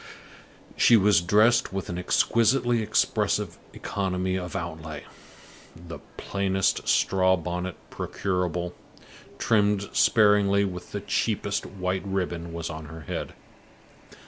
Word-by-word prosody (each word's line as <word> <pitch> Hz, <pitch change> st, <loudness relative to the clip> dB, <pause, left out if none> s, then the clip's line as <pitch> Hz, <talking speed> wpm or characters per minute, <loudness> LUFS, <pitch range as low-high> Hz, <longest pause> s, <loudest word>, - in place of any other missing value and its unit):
She 120 Hz, -, +6 dB
was 100 Hz, -3 st, +4 dB
dressed 105 Hz, +7 st, +3 dB
with 95 Hz, 0 st, -4 dB
an 90 Hz, 0 st, -4 dB
exquisitely 115 Hz, +5 st, +2 dB
expressive 110 Hz, -, 0 dB
economy 95 Hz, -2 st, -2 dB
of 90 Hz, -2 st, -5 dB
outlay. 80 Hz, -3 st, -5 dB, 0.7 s
The 85 Hz, 0 st, -10 dB, 0.2 s
plainest 95 Hz, -1 st, -1 dB
straw 95 Hz, 0 st, +3 dB
bonnet 90 Hz, +2 st, -4 dB, 0.2 s
procurable, 90 Hz, -2 st, -2 dB, 0.6 s
trimmed 105 Hz, -2 st, +1 dB
sparingly 105 Hz, -2 st, +4 dB
with 90 Hz, -2 st, -7 dB
the -, -, -4 dB
cheapest -, -, -1 dB
white 95 Hz, -1 st, -3 dB
ribbon, 90 Hz, -4 st, -3 dB
was 85 Hz, 0 st, -5 dB
on 80 Hz, -1 st, -7 dB
her 80 Hz, +2 st, -10 dB
head. 75 Hz, -, -5 dB
95 Hz, 110 wpm, -26 LUFS, 85-100 Hz, 0.7 s, She